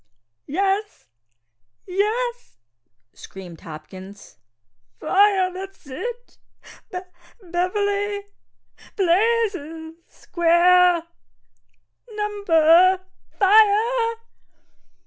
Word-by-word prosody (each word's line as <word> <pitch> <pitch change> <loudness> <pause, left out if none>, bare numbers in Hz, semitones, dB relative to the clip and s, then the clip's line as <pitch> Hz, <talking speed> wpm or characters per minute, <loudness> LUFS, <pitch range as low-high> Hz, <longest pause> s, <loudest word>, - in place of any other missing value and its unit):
"Yes, 395 +6 -2 0.8
yes," 460 - -2 0.6
screamed 180 -4 -12
Hopkins, 185 +6 -12 0.6
"fire! - - -6
fire 385 -2 +3
that's 385 -1 -10
it! 475 - -8 0.5
B! 365 - -5 0.5
B 350 - -17
Beverly! 405 +3 -1 0.7
blazes! 360 -5 0
square! 345 0 +3 1.1
number 370 -3 +3 0.4
Fire!" 440 +4 +3
380 Hz, 60 wpm, -22 LUFS, 335-420 Hz, 1.1 s, fire